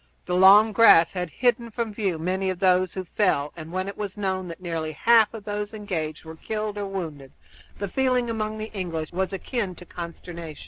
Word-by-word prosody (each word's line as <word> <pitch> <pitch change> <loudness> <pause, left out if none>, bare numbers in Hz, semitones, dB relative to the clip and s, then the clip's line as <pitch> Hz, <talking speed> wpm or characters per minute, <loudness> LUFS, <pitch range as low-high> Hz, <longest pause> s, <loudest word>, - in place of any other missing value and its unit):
The 180 - -3
long 200 +4 +7
grass 205 -6 +6
had 180 -2 -3
hidden 240 +3 0
from 225 -1 -3
view 195 -6 -1
many 185 +4 -1
of 185 - -2
those 185 -1 +2
who 190 - -3
fell, 160 -6 0
and 160 -1 -9
when 185 +1 -2
it 200 - -5
was 205 -1 -5
known 190 -2 -2
that 170 +1 -8
nearly 165 -3 -4
half 225 +7 +4
of 225 -3 -9
those 210 +1 -4
engaged 165 -8 -4
were 160 0 -9
killed 215 +2 -4
or 200 - -3
wounded 160 -8 -6 0.4
the 200 - -3
feeling 255 +2 +1
among 215 -1 -3
the 215 +1 -6
English 165 -5 -4
was 190 +2 -1
akin 195 0 -3
to 180 - -12
consternation. 170 -2 -8
190 Hz, 200 wpm, -25 LUFS, 170-215 Hz, 0.4 s, long